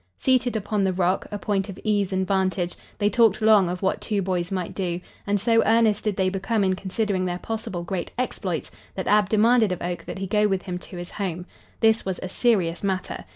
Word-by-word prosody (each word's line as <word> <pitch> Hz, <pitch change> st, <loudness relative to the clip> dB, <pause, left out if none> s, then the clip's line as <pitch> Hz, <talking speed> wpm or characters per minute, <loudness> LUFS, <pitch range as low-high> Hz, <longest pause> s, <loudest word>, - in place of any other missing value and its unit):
Seated 255 Hz, -2 st, +2 dB
upon 210 Hz, -1 st, 0 dB
the 190 Hz, -1 st, +1 dB
rock, 185 Hz, +1 st, 0 dB
a 205 Hz, -, -3 dB
point 200 Hz, -1 st, -1 dB
of 195 Hz, -, -7 dB
ease 205 Hz, -2 st, +1 dB
and 190 Hz, 0 st, 0 dB
vantage, 185 Hz, -2 st, 0 dB, 0.2 s
they 205 Hz, -, +2 dB
talked 220 Hz, -2 st, +4 dB
long 215 Hz, -4 st, +5 dB
of 180 Hz, +2 st, -4 dB
what 190 Hz, -, 0 dB
two 210 Hz, -2 st, -1 dB
boys 180 Hz, -1 st, -1 dB
might 185 Hz, -2 st, -3 dB
do, 175 Hz, -3 st, -2 dB, 0.3 s
and 205 Hz, 0 st, +2 dB
so 230 Hz, +2 st, +3 dB
earnest 220 Hz, -2 st, +3 dB
did 210 Hz, -2 st, 0 dB
they 190 Hz, -1 st, +1 dB
become 195 Hz, +3 st, 0 dB
in 190 Hz, -1 st, +2 dB
considering 190 Hz, 0 st, -1 dB
their 175 Hz, -1 st, -2 dB
possible 205 Hz, -4 st, -4 dB
great 175 Hz, 0 st, -3 dB
exploits 190 Hz, -9 st, -3 dB, 0.2 s
that 190 Hz, -, -4 dB
Ab 210 Hz, -2 st, +4 dB
demanded 220 Hz, 0 st, +4 dB
of 180 Hz, -, -2 dB
Oak 175 Hz, 0 st, -4 dB
that -, -, -6 dB
he 195 Hz, -, -3 dB
go 210 Hz, +2 st, +2 dB
with 195 Hz, -2 st, -1 dB
him 180 Hz, -2 st, -4 dB
to 180 Hz, -, -10 dB
his 175 Hz, +1 st, -7 dB
home. 180 Hz, -4 st, -4 dB, 0.4 s
This 220 Hz, 0 st, +4 dB
was 190 Hz, -1 st, -3 dB
a 185 Hz, -, -4 dB
serious 190 Hz, -7 st, +1 dB
matter. 190 Hz, -2 st, -2 dB
195 Hz, 220 wpm, -24 LUFS, 185-215 Hz, 0.4 s, long